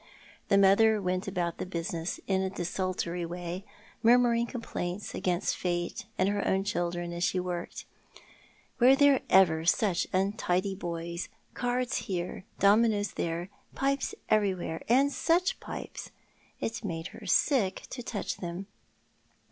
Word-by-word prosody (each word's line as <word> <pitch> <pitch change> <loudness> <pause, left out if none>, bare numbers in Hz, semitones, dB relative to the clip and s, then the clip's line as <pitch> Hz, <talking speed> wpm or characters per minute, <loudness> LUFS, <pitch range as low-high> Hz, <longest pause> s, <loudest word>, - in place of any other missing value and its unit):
The 200 - +4
mother 210 +3 +5
went 185 -1 -1
about 175 -3 -2
the - - -1
business 170 -1 -3
in 190 -1 +1
a 190 - 0
desultory 180 -1 -2
way, 175 +2 -5 0.4
mur 235 +2 +7
muring 235 -1 +2
complaints 205 -5 -4
against 180 0 0
fate 175 +3 -2
and 185 - +3
her 205 0 0
own 190 0 +2
children 175 -4 -2
as 170 0 -3
she 185 - +1
worked. 180 -1 -4 0.9
Were 255 +2 +7
there 280 -1 +5
ever 165 -4 +5
such 180 +2 +2
untidy 190 0 0
boys 170 -1 -4
— - - -39
cards 250 +1 0
here, 180 0 -3
dominoes 205 0 +4
there, 170 +2 -3 0.3
jjipes 275 0 0
everywhere— 190 -6 +1
and 270 +4 +4
such 350 +7 +1
pipes! - - -7 0.5
It 230 +1 -3
made 165 -5 -4
her 210 - -11
sick 205 -1 +2
to 250 - -5
touch 225 -3 -4
them. 175 +2 -5
190 Hz, 140 wpm, -29 LUFS, 175-220 Hz, 0.9 s, mur